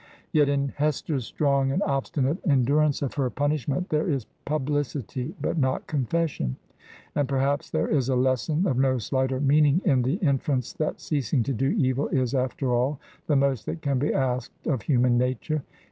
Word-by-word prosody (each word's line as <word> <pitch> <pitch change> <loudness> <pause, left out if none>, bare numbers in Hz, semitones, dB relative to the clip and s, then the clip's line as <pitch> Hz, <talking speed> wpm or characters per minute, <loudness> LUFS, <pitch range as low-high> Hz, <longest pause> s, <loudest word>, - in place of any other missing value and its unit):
Yet, 145 -2 +4
in 140 -1 +1
Hester's 145 -3 -1
strong 140 -2 +1
and 185 +8 +1
obstinate 140 +3 0
endurance 145 0 +2
of 135 - -2
her 135 -3 0
pun 145 +5 0
ishment 150 +4 -2
there 155 +3 +1
is 135 -7 -1 0.2
publicity 145 -2 -2
but 165 - -1
not 130 -2 0
confession; 145 - -1 0.6
and 145 -3 0
per 135 - 0
haps 140 +2 0
there - - 0
is 135 -4 +1
a 130 - +2
lesson 130 - +1
of 130 -9 +1
no 130 -1 +3
slighter 130 +3 -1
meaning 145 +2 +4
in 135 -8 +4
the 130 +5 +1
in 145 - +1
ference 130 -4 -2
that 155 - -2
ceasing 135 -4 0
to 135 - -2
do 135 +3 0
evil 130 -1 +1
is, 130 -1 0
after 130 0 0
all, 130 +4 +1 0.3
the 150 - +2
most 135 -4 +1
that 165 - -4
can 140 -3 +1
be 145 - +1
asked 130 -2 -2
of 135 -7 0
human 125 -3 +3
nature. 130 +5 -1
135 Hz, 185 wpm, -26 LUFS, 130-150 Hz, 0.6 s, Yet